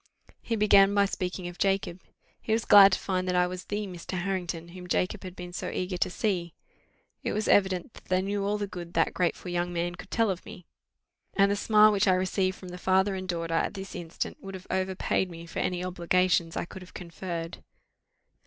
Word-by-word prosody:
He 230 - -2
began 200 -2 +5
by 200 0 +5
speaking 185 -2 -3
of 175 0 -9
Jacob: 195 -2 0 0.4
he 220 - -1
was 225 0 0
glad 200 -1 +9
to - - +1
find 185 -1 -2
that 180 - 0
I 180 0 +4
was 180 0 -6
the 210 +1 -3
Mr. 185 -1 -6
Harrington 175 -2 -3
whom 180 +1 -10
Jacob 185 +3 0
had 185 -1 -8
been 180 0 -8
so - - -4
eager 185 0 -3
to 185 - +1
see. 180 -3 -2 0.7
It - - -2
was 215 0 -1
evident 190 0 +2
that - - -15
they 185 0 +1
knew 200 +1 -1
all 205 +1 0
the 205 - -2
good 175 -3 -8
that 165 - +2
grateful 180 0 -1
young 175 0 -1
man 175 0 -2
could 180 - -11
tell 225 -3 +2
of 185 - -5
me; 180 - -11 0.7
and 200 0 +4
the - - +2
smile 215 +1 +5
which 200 -2 +2
I 185 - +5
received 185 0 0
from 185 - -10
the 180 0 -8
father 190 +2 +2
and 185 -1 -5
daughter 165 -1 -2
at 165 - 0
this 195 0 -7
instant 170 -1 -5
would 195 0 -7
have 185 0 -10
overpaid 190 0 0
me 170 -1 -9
for 165 - -6
any 180 0 -1
obligations 180 -1 +1
I - - -1
could 185 - -10
have 180 - -14
conferred. 170 -1 -6
185 Hz, 220 wpm, -28 LUFS, 175-195 Hz, 0.7 s, glad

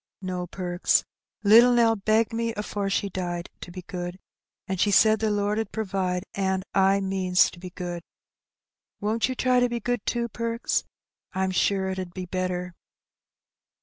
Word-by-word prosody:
No, 180 -2 -4
Perks, 175 0 +1 0.4
little 230 +4 +7
Nell 230 -2 +4
begged 220 +2 +1
me 230 0 -1
afore 205 -1 -3
she 200 +1 0
died 175 -2 -4
to - - -9
be 180 +1 -8
good, 175 0 -5 0.5
an' 190 - -2
she 205 - +2
said 215 +2 +5
the 220 0 +1
Lord 205 +1 0
'ud 225 - -3
provide, 190 -3 -2
an' 190 -1 0
I 195 +1 +4
means 190 -2 +2
to 175 - -13
be 180 0 -7
good. 175 -1 -5 1.0
Won't 220 +4 0
you 255 - -2
try 255 0 +3
to 245 0 +2
be 240 0 -2
good, 245 0 -2
too, 235 -1 0
Perks? 230 0 -2 0.5
I'm 190 0 0
sure 190 +1 +1
it 190 - -4
'ud 180 -2 -6
be 185 -1 -4
better." 180 0 -3
195 Hz, 170 wpm, -26 LUFS, 185-220 Hz, 1.0 s, little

